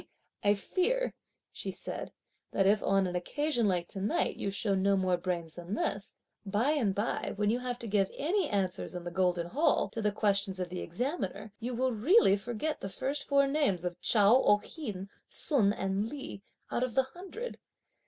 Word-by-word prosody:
"I 205 0 +5
fear," 420 - 0 0.4
she - - -5
said, - - -4 0.4
"that 195 - +3
if, 205 +2 +4
on 195 -1 +2
an 180 -1 -3
occasion 240 - 0
like 175 -3 +1
to 195 - -5
night, 205 - +1
you 200 - -2
show 195 +1 0
no 195 +1 +3
more 185 -1 +2
brains 175 -2 -3
than 175 +4 -5
this, 200 -1 -2 0.3
by 215 +7 +1
and 230 -11 +1
by 205 +3 -1
when 210 +1 +1
you 240 - 0
have 250 -1 -3
to 235 - -6
give 200 -2 +2
any 355 +4 +1
answers 190 -3 -1
in 175 - -5
the 175 - -5
golden 180 -1 +1
hall, 285 - +2
to 225 - -3
the 210 -1 +2
questions 200 -2 +1
(of 180 -1 -2
the 180 0 -5
examiner), 210 - -3
you 245 +1 -3
will, 255 +2 +1
really, 250 - +5
forget 235 +9 -3
(the - - -3
very 195 +7 -2
first 290 - -3
four 280 -1 +4
names) 275 - +1
of 175 0 -4
Chao, 220 +4 +5
Oh'ien, 205 - 0 0.2
Sun 235 -10 +3
and 195 +1 -1
Li 275 -8 -6 0.3
(out - - 0
of 255 -3 -1
the 265 - +5
hundred)! 380 - -8
205 Hz, 190 wpm, -31 LUFS, 190-260 Hz, 0.4 s, I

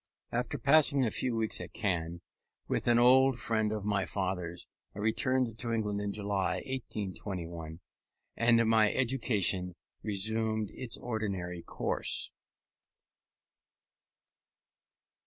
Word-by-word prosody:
After 125 +4 -1
passing 140 +1 +4
a 110 - 0
few 125 -2 -1
weeks 110 -1 0
at - - -8
Caen 85 -5 -2 0.5
with - - -1
an 120 -1 +5
old 130 +1 +6
friend 110 -2 0
of 105 -2 -3
my 105 -2 +1
father's, 90 -3 -3 0.3
I - - -10
returned 115 +2 0
to 120 -1 -2
England 105 -3 -1
in 100 0 -2
July, 100 -2 -1
1821 90 -9 -5 0.5
and 115 -1 +4
my 110 -1 +4
education 105 -8 0 0.3
resumed 110 +1 -1
its 120 -2 -1
ordinary 95 -7 -3
course. - - 0
110 Hz, 110 wpm, -31 LUFS, 95-120 Hz, 0.5 s, old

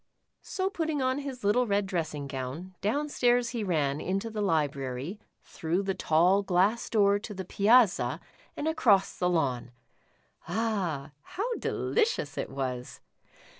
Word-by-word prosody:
So 375 -1 -2
putting 320 -5 -1
on 260 +1 +1
his 270 -4 -6
little 235 +5 +3
red 200 -1 +1
dressing 160 -6 -3
gown, 140 +7 -6
down 280 +10 0
stairs 245 -4 +2
he 235 -3 -3
ran, 150 -6 0
into 195 +4 -2
the 215 -1 -3
library, 145 -1 -1 0.2
through 170 +4 -2
the 195 0 -1
tall 180 +4 +3
glass 195 +4 +1
door 205 -2 +3
to 210 0 -8
the 190 0 -5
piazza 210 +2 +3 0.4
and 295 - -2
across 220 -12 +3
the 180 - 0
lawn. 130 -9 0 0.8
Ah, 175 -8 -1
how 445 - -3
delicious 425 - 0
it - - -3
was 125 -2 -4
195 Hz, 140 wpm, -29 LUFS, 155-235 Hz, 0.8 s, little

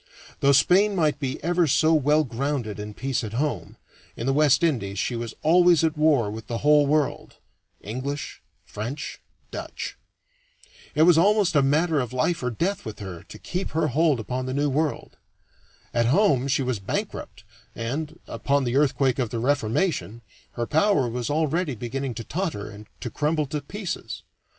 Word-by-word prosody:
Though 140 - +4
Spain 195 +9 +4
might 155 -5 +1
be 135 -1 -3
ever 175 0 +2
so 155 +4 +3
well 150 0 +3
grounded 125 -4 -3
in 105 0 -7
peace 130 -1 -2
at 110 -1 -5
home, 120 - -2 0.4
in 115 - -4
the 135 - +2
West 150 +1 +4
Indies 110 -12 0
she 120 +5 -1
was 115 -1 -5
always 175 0 +5
at 160 -1 +1
war 150 -9 +3
with 110 +1 -8
the 115 - -2
whole 150 -1 +5
world 150 0 0 0.5
English, 130 +7 -5 0.2
French, 115 +8 -6 0.3
Dutch. - - -6 1.0
It 155 - +5
was 165 -1 +6
almost 205 -1 +3
a 145 - +6
matter 150 +3 +2
of 125 -2 -3
life 130 +7 0
or 125 - -1
death 175 - -2
with 110 -2 -7
her 95 -5 -7
to - - -12
keep 185 +2 -4
her 155 - +2
hold 150 0 +2
upon 125 +3 -3
the 130 - -3
New 145 0 +1
World. 150 +2 -2 0.8
At 120 -1 +2
home 140 - +3
she 135 0 +1
was 125 -4 -1
bankrupt 95 - -5 0.3
and, 150 +8 -4
upon 140 0 0
the 125 +1 0
earthquake 135 -2 +2
of 120 -4 0
the 120 - -4
Reformation, 120 - 0 0.3
her 120 - -2
power 160 - +2
was 120 +2 -3
already 155 0 0
beginning 125 +2 -4
to 115 - -5
totter 155 - -3
and 105 +1 -12
to 120 - -4
crumble 155 0 0
to 145 +2 -4
pieces. 195 +6 -6
140 Hz, 175 wpm, -25 LUFS, 120-155 Hz, 1.0 s, was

